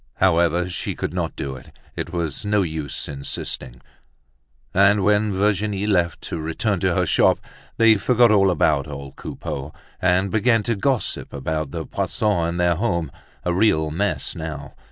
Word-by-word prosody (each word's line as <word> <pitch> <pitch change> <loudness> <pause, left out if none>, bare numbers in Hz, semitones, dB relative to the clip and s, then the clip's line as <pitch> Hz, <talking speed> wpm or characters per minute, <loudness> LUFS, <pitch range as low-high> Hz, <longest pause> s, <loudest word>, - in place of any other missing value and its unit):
However, 85 -1 +2
she 90 -4 -4
could - - -4
not 85 -3 -2
do 70 -1 -4
it, 65 - -13 0.2
it - - -4
was 85 -5 -3
no 105 -1 +2
use 80 -5 -4
insisting! 70 -3 -5 0.9
And 100 +1 +4
when 105 +1 +3
Virginie 100 +1 0
left 90 -6 +1
to 85 - -4
return 80 +1 -1
to - - +1
her - - +2
shop, - - +4 0.4
they 115 -1 +6
forgot 120 +2 +4
all 100 -2 +5
about 75 -5 +2
old 70 -2 -8
Coupeau 70 +2 -6 0.3
and 95 +1 +2
began 115 0 +3
to 115 0 0
gossip 125 +4 -1
about 75 +2 -3
the - - -5
Poissons 100 -6 0
and 85 +1 -3
their 85 -1 +2
home, 85 -6 -1 0.3
a 90 - +1
real 80 -6 +2
mess 100 +5 -1
now. 75 -3 -6
90 Hz, 160 wpm, -22 LUFS, 80-105 Hz, 0.9 s, they